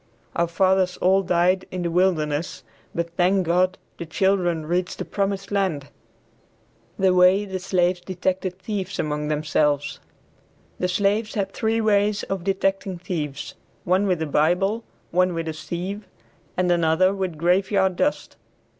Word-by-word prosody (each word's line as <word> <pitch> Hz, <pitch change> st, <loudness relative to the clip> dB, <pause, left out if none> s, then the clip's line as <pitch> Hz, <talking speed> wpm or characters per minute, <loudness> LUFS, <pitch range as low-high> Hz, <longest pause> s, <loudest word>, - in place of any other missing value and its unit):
Our 170 Hz, -, +2 dB
fathers 185 Hz, +1 st, +2 dB
all 190 Hz, +2 st, +3 dB
died 180 Hz, +1 st, +2 dB
in 180 Hz, -1 st, -4 dB
"the 170 Hz, -, -1 dB
wilderness," 165 Hz, -5 st, 0 dB, 0.3 s
but 170 Hz, 0 st, -3 dB
thank 185 Hz, +1 st, +3 dB
God, 180 Hz, +2 st, +2 dB, 0.2 s
the 170 Hz, -, -4 dB
children 175 Hz, -2 st, +1 dB
reached 180 Hz, +3 st, -1 dB
"the -, -, -4 dB
promised 195 Hz, 0 st, -2 dB
land." 185 Hz, -9 st, -1 dB, 1.1 s
THE 190 Hz, -1 st, +3 dB
WAY 185 Hz, +3 st, +5 dB
THE 190 Hz, -1 st, -4 dB
SLAVES 180 Hz, -1 st, +1 dB
DETECTED 185 Hz, 0 st, -2 dB
THIEVES 195 Hz, -3 st, -3 dB
AMONG 150 Hz, 0 st, -2 dB
THEMSELVES. 150 Hz, -1 st, 0 dB, 0.8 s
The 180 Hz, -, +1 dB
slaves 205 Hz, +4 st, 0 dB
had 200 Hz, -3 st, -1 dB
three 225 Hz, +1 st, 0 dB
ways 210 Hz, -1 st, +2 dB
of 195 Hz, -2 st, -4 dB
detecting 195 Hz, 0 st, -1 dB
thieves, 150 Hz, -5 st, -4 dB, 0.3 s
one 185 Hz, +3 st, +2 dB
with 180 Hz, -3 st, +1 dB
a -, -, -1 dB
Bible, 180 Hz, +9 st, +1 dB, 0.3 s
one 180 Hz, 0 st, +2 dB
with 165 Hz, 0 st, -3 dB
a 160 Hz, -, -2 dB
sieve, 185 Hz, +6 st, -5 dB, 0.5 s
and 180 Hz, -1 st, +2 dB
another 170 Hz, +2 st, +3 dB
with 190 Hz, -5 st, -3 dB
graveyard 190 Hz, +3 st, +2 dB
dust. 290 Hz, +10 st, -1 dB
185 Hz, 145 wpm, -23 LUFS, 170-195 Hz, 1.1 s, WAY